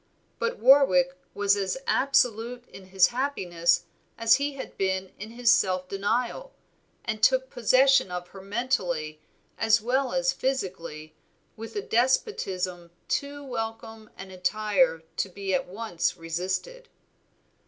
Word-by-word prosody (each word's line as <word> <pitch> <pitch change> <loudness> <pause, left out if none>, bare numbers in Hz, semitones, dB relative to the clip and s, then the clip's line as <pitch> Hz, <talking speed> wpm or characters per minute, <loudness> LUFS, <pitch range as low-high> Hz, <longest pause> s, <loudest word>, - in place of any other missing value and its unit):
But 470 +1 -1
Warwick 270 +1 +5 0.2
was 200 0 +3
as 195 +3 -2
absolute 245 -2 +1
in 190 - -13
his 190 -1 +4
happiness 180 -10 0 0.3
as 230 0 +5
he 285 +1 -2
had 275 - -8
been 190 -1 -1
in 210 +2 -7
his 235 0 +2
self 185 -5 +2
denial, 235 - -2 0.5
and 215 -2 -3
took 260 +2 +3
possession 260 0 +4
of 180 0 -6
her 195 - -11
mentally 185 -8 -2 0.4
as 225 0 +4
well 255 +3 0
as 265 0 +1
physically 175 - -4 0.4
with 225 - -9
a 410 - -2
despotism 190 - 0 0.2
too 285 0 -2
welcome 225 -3 -6
and 190 -1 -9
entire 210 0 +1
to 195 - -1
be 195 +1 -4
at 180 - 0
once 180 -3 -2
resisted. 185 - -4
220 Hz, 130 wpm, -26 LUFS, 185-260 Hz, 0.5 s, Warwick